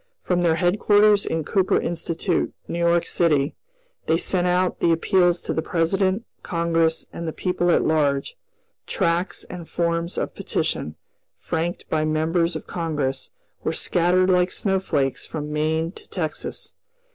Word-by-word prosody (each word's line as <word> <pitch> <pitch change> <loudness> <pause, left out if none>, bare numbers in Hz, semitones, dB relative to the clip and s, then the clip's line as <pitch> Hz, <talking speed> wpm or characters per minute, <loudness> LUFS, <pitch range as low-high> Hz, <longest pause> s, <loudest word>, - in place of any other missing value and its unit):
From 180 -1 +1
their 165 -2 +3
headquarters 205 +4 +4
in 160 -1 -1
Cooper 190 +4 +2
Institute, 170 +1 -1
New 170 - -3
York 170 0 +3
city, 150 -4 +1 0.5
they 160 - +3
sent 180 +1 0
out 180 0 +1
the 170 - +3
appeals 175 +1 +3
to - - -3
the 160 - 0
President, 185 +6 0 0.2
Congress, 165 -2 0
and 170 - -5
the - - -1
people 180 +1 -1
at - - +4
large; 145 - +1 0.5
tracts 175 0 0
and 170 -2 -9
forms 170 0 -1
of - - -2
petition, - - -2 0.4
franked 170 +1 -3
by 155 -1 0
members 160 +2 +1
of 160 - -5
Congress, 150 -6 -2 0.3
were - - 0
scattered 180 +2 +2
like 180 0 +3
snowflakes 160 - 0
from 150 -1 -5
Maine 160 +2 0
to - - -15
Texas. 160 -5 -4
170 Hz, 145 wpm, -23 LUFS, 160-180 Hz, 0.5 s, headquarters